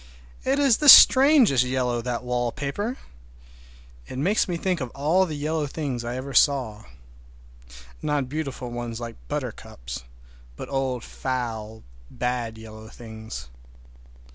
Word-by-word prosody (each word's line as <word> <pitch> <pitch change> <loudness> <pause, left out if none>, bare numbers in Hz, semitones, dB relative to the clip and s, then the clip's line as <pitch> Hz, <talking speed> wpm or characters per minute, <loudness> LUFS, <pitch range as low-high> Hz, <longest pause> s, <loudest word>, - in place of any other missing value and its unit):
It 270 +1 +1
is 275 -5 +4
the 295 - +4
strangest 260 - +8
yellow, 125 -2 -1
that 120 0 -4
wallpaper! 140 - -3 1.1
It 130 - -8
makes 185 +10 +1
me 175 -2 -2
think 180 -2 -1
of 130 - -3
all 165 +7 +2
the 155 - -5
yellow 155 +1 -2
things 135 -5 -4
I 120 +1 -4
ever 135 +2 -6
saw—not 125 -9 +2 1.4
beautiful 135 -4 -5
ones 120 -1 -5
like 115 -1 -7
buttercups, - - -6 0.5
but - - -8
old 130 -3 -2
foul, 110 -4 -5 0.3
bad 120 -2 -3
yellow 110 0 -11
things. 110 - -9
125 Hz, 120 wpm, -24 LUFS, 115-155 Hz, 1.4 s, strangest